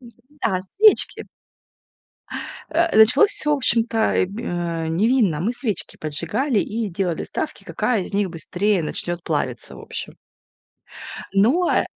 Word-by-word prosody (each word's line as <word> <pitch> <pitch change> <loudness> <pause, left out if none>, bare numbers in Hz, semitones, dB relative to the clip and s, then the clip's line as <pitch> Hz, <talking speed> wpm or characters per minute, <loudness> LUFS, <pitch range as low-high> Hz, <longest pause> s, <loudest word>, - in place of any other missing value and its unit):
Да, 240 -4 -4
свечки. 415 - +3 1.5
Э, 335 -2 +1
началось 225 - +6
всё, 300 -7 +1
вощем-то, 235 -4 +2 0.2
э, - - +3
г, 205 +5 -7
э, 170 -5 -3
невинно. 200 - +2
Мы 215 +8 0
свечки 225 -7 -3
поджигали 170 - -1
и 220 0 -3
делали 180 -2 -2
ставки, - - -5
какая 225 -6 0
из 195 - -8
них 200 -2 +1
быстрее 180 +3 -1
начнёт 175 +2 -3
плавиться, - - -3
в - - -11
общем. - - -4 1.2
Но, 245 - +3
э - - +2
210 Hz, 130 wpm, -22 LUFS, 175-250 Hz, 1.5 s, началось